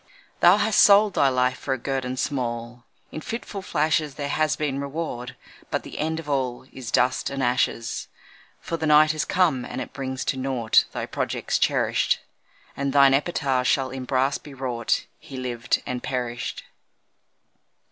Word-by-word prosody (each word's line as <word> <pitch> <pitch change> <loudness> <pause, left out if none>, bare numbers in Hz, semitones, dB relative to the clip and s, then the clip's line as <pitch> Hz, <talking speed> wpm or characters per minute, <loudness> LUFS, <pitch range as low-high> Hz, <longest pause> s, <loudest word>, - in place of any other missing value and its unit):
Thou 175 +3 +7
hast 210 0 +2
sold 205 0 +6
thy 140 - +4
life 125 0 +1
for 135 - -1
a - - -6
guerdon 130 0 -3
small 120 -3 -3 0.3
In 155 - -6
fitful 220 -2 -5
flashes; 155 -4 0
There 145 -1 -4
has 155 +1 +1
been 140 -2 -2
reward 140 -4 -5 0.3
but - - -2
the - - -8
end 160 +1 -1
of 160 - -9
all 130 -4 -1
Is 125 -3 -7
dust 125 +1 +2
and 135 -1 -3
ashes. 120 -1 0 0.5
For 165 - -4
the 160 -1 -2
night 155 +1 +6
has 155 -1 -2
come 165 -9 +2
and - - -6
it - - -6
brings 130 -1 -4
to 135 - -1
naught 130 -4 +2
Thy - - -4
projects - - -2
cherished, - - +2 0.6
And 140 0 -2
thine 140 -1 +6
epitaph 135 -4 +1
shall 135 +1 +1
in 130 -1 -6
brass 135 +2 +1
be 145 -2 -12
wrought 125 -3 -1
'He 135 - -10
lived 125 -2 -1
and 125 -1 -3
perished.' 125 -1 -4
135 Hz, 165 wpm, -24 LUFS, 125-150 Hz, 0.6 s, Thou